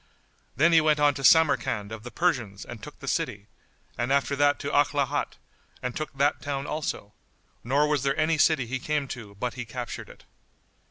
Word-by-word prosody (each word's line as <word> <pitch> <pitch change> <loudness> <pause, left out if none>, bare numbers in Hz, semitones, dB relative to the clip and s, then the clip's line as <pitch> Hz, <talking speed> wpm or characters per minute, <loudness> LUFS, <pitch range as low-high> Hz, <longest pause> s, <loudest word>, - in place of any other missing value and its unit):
Then 165 +6 +4
he 160 - +7
went 155 -1 +2
on 145 -1 +4
to 135 0 -7
Samarcand 130 -9 +4
of 110 -1 -7
the 120 - -8
Persians 120 - -1
and 120 -3 -9
took - - -10
the - - -10
city, 100 0 -2 0.5
and 120 +3 0
after 140 0 +2
that 145 0 +3
to 140 - -3
Akhlát[FN#77] 145 -1 +1 0.5
and 125 -1 -3
took 155 - -4
that 140 +2 +1
town 140 -1 -3
also; 145 -9 -4 0.5
nor 140 +5 +2
was 150 -2 +1
there 140 +1 0
any 155 0 +1
city 150 -5 +3
he 130 +3 -3
came 150 +1 -1
to 105 -5 -8
but 120 +4 -3
he 125 - -5
captured 120 0 -6
it. - - -15
140 Hz, 195 wpm, -26 LUFS, 120-150 Hz, 0.5 s, he